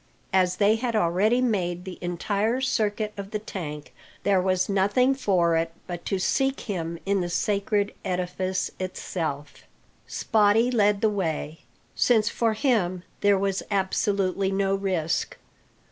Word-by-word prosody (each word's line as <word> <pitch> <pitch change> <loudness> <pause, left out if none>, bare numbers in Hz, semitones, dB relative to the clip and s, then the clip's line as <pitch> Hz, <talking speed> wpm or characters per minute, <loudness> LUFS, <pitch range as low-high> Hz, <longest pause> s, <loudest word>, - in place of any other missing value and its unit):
As 185 -1 +3
they 210 +3 +3
had 235 0 -2
already 210 +6 +2
made 180 -7 -1
the 185 -2 -8
entire 200 +7 -1
circuit 215 -4 0
of 200 -1 -6
the 215 - -2
tank, 150 -10 -7 0.3
there 195 -2 +3
was 185 0 +1
nothing 205 +7 +3
for 185 -10 +2
it 165 0 0
but 175 -1 -7
to 195 - 0
seek 270 +8 0
him 170 -5 -4
in 195 -1 +1
the 175 - -2
sacred 200 +3 0
edifice 185 0 -2
itself. 160 -5 -4 0.5
Spottie 220 +3 +3
led 210 -2 +3
the 220 - +4
way, 165 -5 -3 0.4
since 220 -4 +3
for 230 -2 +1
him 210 -8 0 0.2
there 205 -1 +4
was 195 0 0
absolutely 195 -1 0
no 195 0 +1
risk. 185 -5 -1
195 Hz, 140 wpm, -25 LUFS, 180-210 Hz, 0.5 s, the